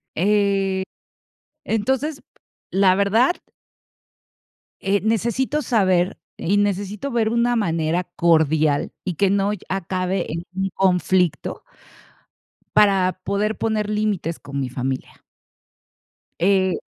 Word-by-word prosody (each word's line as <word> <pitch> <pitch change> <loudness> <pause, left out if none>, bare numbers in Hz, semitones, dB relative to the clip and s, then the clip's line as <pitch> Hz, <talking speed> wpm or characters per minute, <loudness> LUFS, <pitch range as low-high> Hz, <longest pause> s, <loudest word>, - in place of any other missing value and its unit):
Eh, 195 0 +1 0.8
entonces, 265 +7 -1 0.5
la 190 -1 +4
verdad 220 - +3 1.5
eh, 195 +1 +1
necesito 235 +7 0
saber 190 -8 +2 0.2
y 195 +5 +1
necesito 205 +5 -1
ver 230 -2 +1
una 235 +1 +2
manera 165 -4 0
cordial 160 -4 +2
y 180 -3 -2
que 195 +4 +2
no 200 +1 +1
lle 210 - -6
acabe 185 0 -1
en 165 +2 -4
un 190 +1 -1
conflicto 180 -2 +1 1.1
para 195 -3 +4
poder 205 +2 -1
poner 215 -2 -1
límites 210 -6 -1
con 140 0 -6
mi 135 - -1
familia. 130 +1 -4 1.2
Eh. 190 0 +3
195 Hz, 105 wpm, -22 LUFS, 180-210 Hz, 1.5 s, la